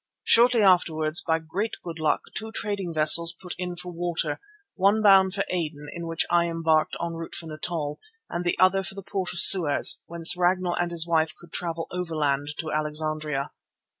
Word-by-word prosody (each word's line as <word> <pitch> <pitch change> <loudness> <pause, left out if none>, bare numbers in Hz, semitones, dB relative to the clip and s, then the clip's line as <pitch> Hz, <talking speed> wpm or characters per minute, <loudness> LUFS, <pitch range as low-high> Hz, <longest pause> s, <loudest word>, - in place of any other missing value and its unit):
Shortly 235 -1 +4
afterwards, 165 -4 +2
by 160 - 0
great 180 +7 -5
good 165 -1 -8
luck, 155 -1 0
two 220 0 -7
trading 205 -5 -4
vessels 165 +2 +5
put 180 -2 -8
in 180 -1 -5
for 180 +1 -9
water, 175 0 -3 0.3
one 200 +3 +1
bound 195 -2 +4
for 195 - -1
Aden, 150 -4 -4
in 170 -1 -7
which 165 -1 -1
I 170 0 +3
embarked 165 -2 0
en 170 0 -4
route 165 0 -8
for 170 - -7
Natal, 155 -1 -5 0.3
and 175 0 -5
the 175 - -1
other 185 +1 +3
for 190 +1 -8
the 195 - -9
port 190 -1 -4
of - - -7
Suez, 165 -7 +7
whence 170 0 +1
Ragnall 180 0 0
and 175 0 -2
his 170 -1 +2
wife 160 -1 0
could 170 -1 -17
travel 165 -2 -5
overland 150 -5 -2
to 160 -2 -5
Alexandria. 155 -2 -3
170 Hz, 185 wpm, -24 LUFS, 160-185 Hz, 0.3 s, Suez